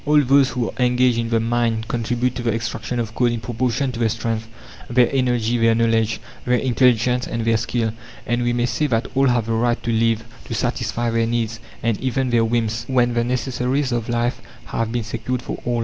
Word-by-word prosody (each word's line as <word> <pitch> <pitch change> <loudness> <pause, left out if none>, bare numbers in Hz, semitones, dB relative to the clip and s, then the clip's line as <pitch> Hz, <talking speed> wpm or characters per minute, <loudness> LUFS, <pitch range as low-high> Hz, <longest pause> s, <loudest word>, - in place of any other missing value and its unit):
All 150 0 +4
those 135 0 +4
who 125 -3 -2
are 125 - -1
engaged 125 -1 +3
in 115 0 -2
the 115 -1 +2
mine 115 -1 0
contribute 120 +1 -1
to 125 - -5
the 120 -1 0
extraction 115 +1 -3
of 110 -2 -3
coal 125 +1 +2
in 120 -1 -1
proportion 125 +3 -1
to 120 - -7
their 115 -1 +2
strength, 115 0 -2 0.4
their 120 0 +4
energy, 120 -3 +1
their 115 0 +4
knowledge, 115 -1 +1 0.2
their 125 0 +2
intelligence, 125 -1 +2
and 115 -1 -3
their 115 0 +3
skill. 115 -1 -1 0.3
And 120 0 0
we 120 0 +1
may 120 0 +1
say 120 +5 0
that 115 -3 0
all 135 +1 +3
have 120 -3 +2
the 115 - -1
right 120 +1 +1
to 115 - -1
live, 115 0 +2 0.2
to - - -4
satisfy 120 0 -1
their 115 0 +1
needs, 115 -1 -1 0.2
and 115 -2 0
even 130 0 0
their 115 -1 +4
whims, 115 0 0
when 125 -2 +2
the 120 0 +1
necessaries 125 +2 -1
of 120 -1 -2
life 120 +1 0 0.2
have 115 -1 -2
been 120 -1 -1
secured 115 +3 -3
for - - -5
all. 120 -1 0
120 Hz, 215 wpm, -21 LUFS, 115-125 Hz, 0.4 s, All